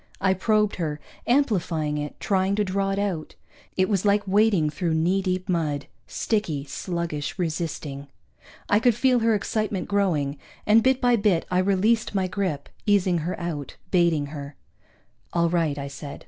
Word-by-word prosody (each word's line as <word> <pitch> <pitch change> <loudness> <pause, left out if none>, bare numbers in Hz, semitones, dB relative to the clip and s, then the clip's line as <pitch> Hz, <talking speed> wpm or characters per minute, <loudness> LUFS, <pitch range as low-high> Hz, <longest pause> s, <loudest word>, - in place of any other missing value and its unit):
I 190 -1 +3
probed 210 +2 +1
her, 155 -4 -2 0.3
amplifying 180 - +1
it, 150 0 -6
trying 195 0 +1
to 210 - +1
draw 195 0 -1
it 195 - -1
out. 195 -6 -2 0.4
It 185 0 +3
was 195 -3 0
like 205 0 +2
wading 195 -6 +3
through 165 +2 -1
knee 175 +5 +2
deep 185 0 -2
mud 155 -6 -1 0.2
sticky, 175 -11 -1
sluggish, 165 +1 -4
resisting. 155 -5 -3 0.6
I 205 - +4
could 235 0 +3
feel 250 +1 +3
her 225 -1 +3
excitement 215 -2 -2
growing, 160 -9 0 0.3
and 215 +2 +6
bit 260 +2 +2
by 245 -2 +4
bit 200 -6 +2
I 180 - +3
released 200 +4 +2
my 190 -1 +2
grip, 185 -6 -2 0.2
easing 190 -4 +3
her 170 +4 -3
out, 160 -5 -5
baiting 170 -5 +3
her. 140 -1 -7 0.8
"All 170 -1 +2
right," 165 -4 0
I 140 0 -4
said. 140 +1 -8
185 Hz, 160 wpm, -25 LUFS, 155-205 Hz, 0.8 s, and